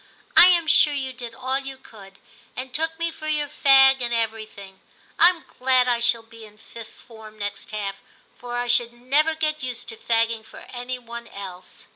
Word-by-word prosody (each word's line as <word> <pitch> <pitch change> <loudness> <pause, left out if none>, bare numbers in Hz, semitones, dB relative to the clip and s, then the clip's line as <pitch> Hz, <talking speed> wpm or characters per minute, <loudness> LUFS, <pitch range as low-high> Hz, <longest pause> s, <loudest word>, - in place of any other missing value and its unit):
* - - -35
I 355 - +10
am 345 -2 +3
sure 300 -2 +4
you 265 -2 -4
did 240 -2 -9
all 260 +2 -2
you 270 -1 -8
could, 195 -6 -16 0.4
and 255 0 -7
took 320 +2 -2
me 335 0 -2
for 310 -1 -9
your 300 -1 -1
fag 270 -2 +5
and 240 -1 -2
everything. 220 -4 -4 0.4
Tm 345 0 +5 0.2
glad 255 0 +3
I 240 -1 +1
shall 235 -1 +2
be 225 0 -15
in 210 -1 -15
Fifth 225 +1 -13
Form 220 -2 -14
next 205 -1 -6
half, 200 -2 -5 0.4
for 245 0 -7
I 245 - -2
should 240 0 +2
never 285 +7 +1
get 310 -1 -2
used 250 -2 -5
to 225 - -9
fagging 230 -1 0
for - - -14
any 250 +1 -5
one 235 -1 -9
else.' 190 -4 -11
245 Hz, 195 wpm, -23 LUFS, 225-270 Hz, 0.4 s, I